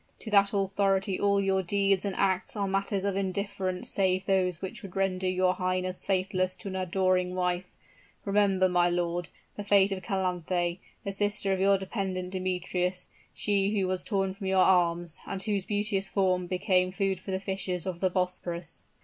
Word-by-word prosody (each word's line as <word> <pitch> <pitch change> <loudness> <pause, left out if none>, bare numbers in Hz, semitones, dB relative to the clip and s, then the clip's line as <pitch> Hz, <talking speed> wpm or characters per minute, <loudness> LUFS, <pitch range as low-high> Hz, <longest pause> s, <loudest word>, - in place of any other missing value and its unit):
To 220 - -8
that 200 -1 +5
authority 195 -1 +1
all 200 0 +3
your 195 -1 +2
deeds 195 +1 +1
and 195 -2 -2
acts 190 +1 0
are 200 -2 -1
matters 195 0 -1
of 200 -1 0
indifference 195 -1 -2
save 185 -1 +1
those 185 -3 +1
which 190 -1 -6
would 195 -3 -10
render 190 -1 0
your 185 0 +2
highness 185 0 -2
faithless 185 -1 0
to 200 - -7
an 190 - -5
adoring 185 0 +1
wife. 180 0 0 0.6
Remember, 200 -2 +3
my 175 -1 +3
lord, 175 0 -1 0.3
the 205 - -4
fate 200 -1 +4
of 190 -1 -3
Calanthe, 180 -2 -1 0.2
the 200 - -3
sister 205 0 +1
of 190 - -1
your 195 +1 +4
dependent 190 -2 -3
Demetrius, 180 -1 -2 0.3
she 205 0 +1
who 190 - +1
was 185 0 -1
torn 195 -3 -1
from 195 0 -6
your 190 -1 +4
arms, 175 -2 +2
and 195 -1 -4
whose 200 -3 -1
beauteous 205 -2 0
form 185 -3 +1
became 185 0 +1
food 195 -1 -1
for 185 - -11
the 190 0 -1
fishes 190 -3 -3
of 180 -2 -4
the 185 - +2
Bosporus." 180 -2 -3
190 Hz, 175 wpm, -28 LUFS, 185-195 Hz, 0.6 s, that